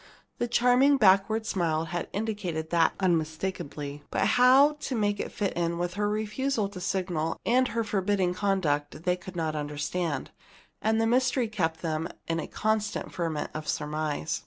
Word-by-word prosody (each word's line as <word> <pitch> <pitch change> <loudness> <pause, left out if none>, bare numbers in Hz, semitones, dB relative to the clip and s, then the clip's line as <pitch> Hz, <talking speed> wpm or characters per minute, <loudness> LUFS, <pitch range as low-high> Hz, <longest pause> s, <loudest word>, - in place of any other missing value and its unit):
The 240 - 0
charming 250 +4 +4
backward 215 0 +4
smile 165 -5 0
had 175 +1 -4
indicated 200 -7 -3
that 165 -2 +3
unmistakably. 160 -4 -2
But 195 - +1
how 260 +5 +6
to 275 -3 -3
make 205 -2 0
it - - -3
fit 200 -3 -2
in 170 0 -1
with 175 +1 -2
her 205 +2 0
refusal 215 +2 -1
to 190 -3 -9
signal 175 -4 -1
and 255 +2 +3
her 230 -1 -1
forbidding 195 -3 0
conduct 165 -7 -1
they 180 0 +2
could 180 +1 -11
not 160 -2 -1
understand, 150 +2 -3 0.5
and 220 +1 +2
the 225 - +2
mystery 250 +1 +2
kept 165 -7 -2
them 160 0 -1 0.2
in 165 0 0
a - - -4
constant 215 -1 -1
ferment 165 -4 -2
of 155 0 -6
surmise. 150 - -2
185 Hz, 160 wpm, -28 LUFS, 160-220 Hz, 0.5 s, how